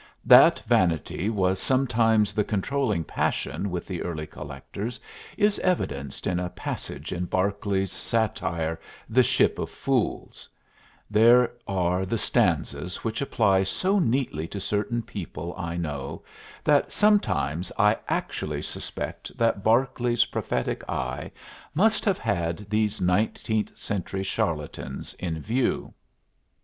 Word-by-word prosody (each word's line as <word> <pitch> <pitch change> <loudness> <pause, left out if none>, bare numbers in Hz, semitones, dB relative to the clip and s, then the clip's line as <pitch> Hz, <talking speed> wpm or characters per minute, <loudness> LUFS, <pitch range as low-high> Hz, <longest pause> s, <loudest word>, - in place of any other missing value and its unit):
That - - +8
vanity 85 +2 +1
was 95 -3 +1
sometimes 115 -5 +2
the 105 - +2
controlling 105 -2 0
passion 100 - -1
with 90 -1 -3
the 90 -3 -4
early 80 -3 -3
collectors 75 - -7 0.4
is 210 -1 +3
evidenced 70 - -1
in 90 -1 0
a 90 0 -2
passage - - -6
in 90 0 -2
Barclay's 95 +1 0
satire, 85 -7 -1 0.3
"The 120 +4 +4
Ship 125 - +2
of - - -2
Fools"; - - -2 0.6
there 115 +3 +6 0.2
are 90 -1 +1
the 100 +5 -1
stanzas 90 -3 0
which 115 +2 -2
apply 105 -8 +3
so 185 - +1
neatly 115 - 0
to 100 - -6
certain 105 +4 -1
people 85 -6 -6
I 85 -3 -4
know 75 -5 -4 0.4
that 145 -1 +3
sometimes 95 - +2
I 105 +2 +5
actually - - -2
suspect - - -6
that 115 -4 +1
Barclay's 120 0 +3
prophetic 65 - -2
eye 65 +2 -3 0.5
must 210 +5 +3
have 200 -3 +2
had 85 -2 -2
these 110 0 +1
nineteenth 105 +3 0
century 95 -1 -3
charlatans 80 -5 -3
in 80 -3 -3
view. 120 - -1
100 Hz, 120 wpm, -26 LUFS, 85-115 Hz, 0.6 s, That